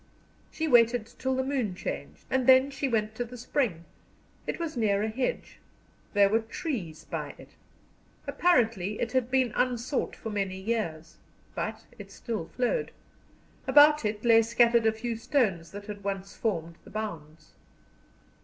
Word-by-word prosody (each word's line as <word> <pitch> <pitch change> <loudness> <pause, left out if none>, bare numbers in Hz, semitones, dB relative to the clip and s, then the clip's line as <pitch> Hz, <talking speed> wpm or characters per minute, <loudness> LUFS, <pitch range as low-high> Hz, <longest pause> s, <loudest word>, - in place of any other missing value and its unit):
She 320 - -3
waited 240 -3 +5
till 260 0 0
the 260 - 0
moon 260 -8 -1
changed, - - -6
and 260 -2 +1
then 260 +1 +6
she 275 0 -2
went 220 -3 0
to 245 - -2
the 245 +1 -10
spring. 230 - -1 0.6
It - - -2
was 330 -3 -3
near 210 -3 +1
a 220 - 0
hedge; 260 - -3 0.6
there 200 -1 +6
were 220 +3 +3
trees 225 - -5
by - - -5
it. - - -14 0.8
Apparently 225 - +2
it 235 - -1
had 255 -2 +1
been 255 -3 +2
unsought 250 +2 0
for 225 - -6
many 195 -2 -2
years. 180 -7 -3 0.4
But - - -4 0.2
it - - -9
still 215 -9 -4
flowed. 255 - -1 0.8
About 295 0 +7
it 210 +1 -2
lay 225 -1 +7
scattered 235 0 +3
a - - +5
few 230 +1 -4
stones 215 - 0
that 205 0 -9
had 205 -1 -8
once 195 -1 -4
formed 170 -6 -2
the - - -14
bounds. 160 -8 -6
225 Hz, 155 wpm, -28 LUFS, 200-255 Hz, 0.8 s, About